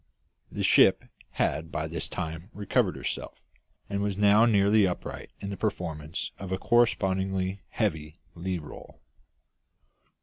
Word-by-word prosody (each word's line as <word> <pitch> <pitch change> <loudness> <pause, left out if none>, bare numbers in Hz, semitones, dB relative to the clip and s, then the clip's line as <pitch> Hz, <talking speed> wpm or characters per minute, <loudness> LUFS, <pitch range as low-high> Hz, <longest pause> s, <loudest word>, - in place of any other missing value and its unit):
The - - -3
ship - - +5 0.3
had 80 +1 -1
by 75 -1 -2
this 80 +1 -4
time 80 +1 -5
recovered 105 -2 +1
herself, - - -5 0.5
and 100 0 -2
was 100 -1 -1
now 105 +3 +6
nearly 100 -1 +4
upright 90 - -5
in 100 - -4
the 100 - -5
performance 85 -6 -3
of 95 -1 -6
a 95 - 0
correspondingly 95 -5 +1
heavy 75 +2 -2 0.2
lee 90 +1 -2
roll. 75 -3 -11
95 Hz, 130 wpm, -28 LUFS, 85-100 Hz, 0.5 s, now